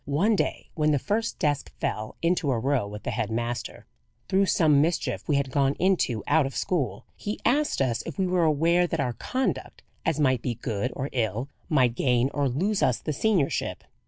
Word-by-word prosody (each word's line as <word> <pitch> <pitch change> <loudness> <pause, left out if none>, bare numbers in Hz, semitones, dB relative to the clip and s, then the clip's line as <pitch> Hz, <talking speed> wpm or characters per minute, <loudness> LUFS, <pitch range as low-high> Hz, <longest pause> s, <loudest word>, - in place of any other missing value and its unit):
One 180 +11 +2
day, - - -2
when 155 -2 +1
the 150 - +3
first 220 - -1
desk 145 -2 -1
fell 110 0 -3
into 170 -3 +1
a 125 - +2
row 130 -2 0
with 105 +1 -8
the - - -2
head 110 -1 -2
master, 120 +1 -3 0.4
through 195 +1 +2
some 150 -6 +4
mischief 165 +3 -1
we 150 - +2
had 140 -1 0
gone 140 0 +2
into 175 - +1
out 150 -1 +3
of 135 - -8
school, 165 -8 -1
he 210 +1 -5
asked 285 - +2
us 120 -3 0
if 165 - -6
we 190 - +1
were 180 -1 +2
aware 165 +3 +3
that 165 - -3
our 125 -3 0
conduct, 255 - -3 0.2
as 165 -3 0
it 150 - +2
might 130 -3 +2
be 120 -2 -2
good 115 +2 -2
or 135 +2 -3
ill, 120 +2 -1 0.2
might 130 -6 +3
gain 125 +1 +1
or 140 -2 +1
lose 190 - 0
us 125 - +3
the 155 - -4
seniorship. 185 -2 0
145 Hz, 205 wpm, -26 LUFS, 125-175 Hz, 0.4 s, some